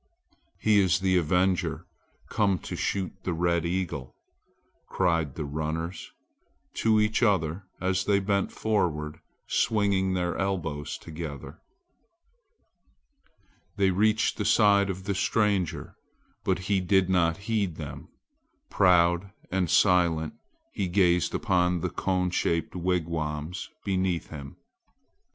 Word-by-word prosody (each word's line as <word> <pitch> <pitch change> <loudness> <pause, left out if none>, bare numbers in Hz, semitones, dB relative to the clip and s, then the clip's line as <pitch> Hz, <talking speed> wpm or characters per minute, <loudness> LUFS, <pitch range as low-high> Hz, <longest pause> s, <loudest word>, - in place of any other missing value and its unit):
"He 105 -1 +4
is 95 -3 +3
the 95 -1 +2
avenger 90 +2 +1 0.4
come 100 -4 +1
to - - -7
shoot 95 -2 -2
the 90 - -2
red 85 0 +1
eagle," 85 -7 -3 0.7
cried 85 -6 0
the 75 - -4
runners 80 +4 -4 0.7
to 110 -1 +3
each 105 +1 +1
other 95 -4 +1
as 95 0 0
they 100 -1 +3
bent 100 0 0
forward 80 -8 -1 0.3
swinging 100 -3 +1
their 90 -1 -1
elbows 80 -7 -2
together. 75 -4 -8 2.2
They 95 -1 +3
reached 110 +4 +2
the 105 - -1
side 100 -1 +4
of 95 0 -4
the 100 - -1
stranger, 100 -3 0 0.5
but - - +1
he 100 0 +2
did 95 0 +3
not 85 -3 +2
heed 105 -7 0
them. - - -8 0.6
Proud 85 +1 +3 0.2
and 90 -2 0
silent 85 -5 +3 0.4
he 95 - -1
gazed 90 -2 +2
upon 90 -5 +1
the - - -2
cone 90 -1 0
shaped 85 -1 -1
wigwams 85 -2 -2 0.2
beneath 95 -3 -1
him. 70 -3 -9
90 Hz, 115 wpm, -27 LUFS, 85-100 Hz, 2.2 s, He